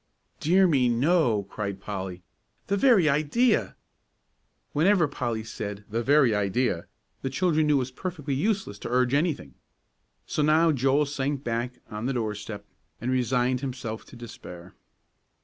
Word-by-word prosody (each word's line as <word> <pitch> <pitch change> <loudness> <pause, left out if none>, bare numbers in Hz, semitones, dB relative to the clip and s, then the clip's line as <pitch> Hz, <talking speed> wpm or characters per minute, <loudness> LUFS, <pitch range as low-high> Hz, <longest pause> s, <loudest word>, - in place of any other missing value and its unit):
"Dear 185 +5 +4
me, 135 -8 +3
no," 120 - +2
cried 100 0 -5
Polly. 95 -3 -6 0.4
"The 200 - 0
very 200 - +5
idea!" 155 - +2 1.0
Whenever 170 +2 +4
Polly 120 -5 -3
said, 105 -2 -6
"The 115 +2 0
very 135 -2 +4
idea!" 105 -2 0 0.3
the 135 - -2
children 155 0 +1
knew 150 - +4
it 130 -2 +2
was 130 - -11
perfectly 150 -2 -4
useless 190 - -1
to - - -6
urge 125 +1 +2
anything. 145 - 0 0.7
So - - -2
now 160 +2 +4
Joel 135 +1 +2
sank 140 0 -2
back 120 +2 -2
on 105 +3 -3
the 135 - 0
doorstep 105 -3 -4 0.3
and 125 +2 -2
resigned 125 0 +1
himself 125 -5 -5
to - - -14
despair. 90 -7 -10
130 Hz, 145 wpm, -26 LUFS, 110-150 Hz, 1.0 s, very